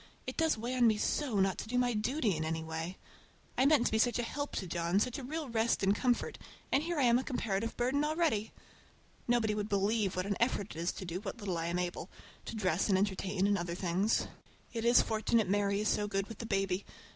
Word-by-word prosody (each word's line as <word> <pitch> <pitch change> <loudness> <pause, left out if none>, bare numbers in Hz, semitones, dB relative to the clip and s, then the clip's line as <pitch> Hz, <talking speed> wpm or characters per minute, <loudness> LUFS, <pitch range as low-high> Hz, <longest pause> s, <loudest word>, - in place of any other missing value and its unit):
It - - -5
does 320 -6 +2
weigh 235 +3 -3
on 245 -2 +4
me 215 -1 +3
so 245 -1 0
not 190 -1 +2
to - - -5
do 245 +2 -1
my 245 -1 +2
duty 220 - 0
in 155 - -2
any 160 0 -2
way! 160 +3 -5 0.6
I 260 +3 +4
meant 285 -5 +4
to - - +1
be 220 - +2
such 240 +1 +3
a 240 - 0
help 285 +5 -4
to 190 - -2
John, 170 +2 0
such 250 +4 -1
a - - -7
real 305 +3 -4
rest 230 -2 +1
and 195 +1 +4
comfort, 245 +2 0 0.3
and 275 - +3
here 340 +1 -2
I 285 - +3
am 240 0 +5
a - - -3
comparative 230 -4 -2
burden 260 +4 +1
already! 305 -9 0 0.8
Nobody 235 -3 +2
would 210 0 -3
believe 200 0 +1
what 185 0 -1
an 200 -1 -1
effort 215 -7 0
it - - -6
is 170 +2 0
to 190 - -7
do 175 +1 -4
what 210 +3 -5
little 200 -5 -3
I 165 - -2
am 170 +1 -1
able—to 180 +4 -6
dress 185 -2 +1
and 190 - +4
entertain, 195 0 0
and 205 0 +2
order 170 0 -3
things. 185 +4 +1 0.5
It 230 -1 -2
is 240 +1 +6
fortunate 220 -1 +1
Mary 200 +1 +1
is 215 - 0
so 210 0 +1
good 195 -1 -1
with 225 -1 -10
the 230 - -5
baby. 195 -2 0
210 Hz, 240 wpm, -32 LUFS, 190-240 Hz, 0.8 s, is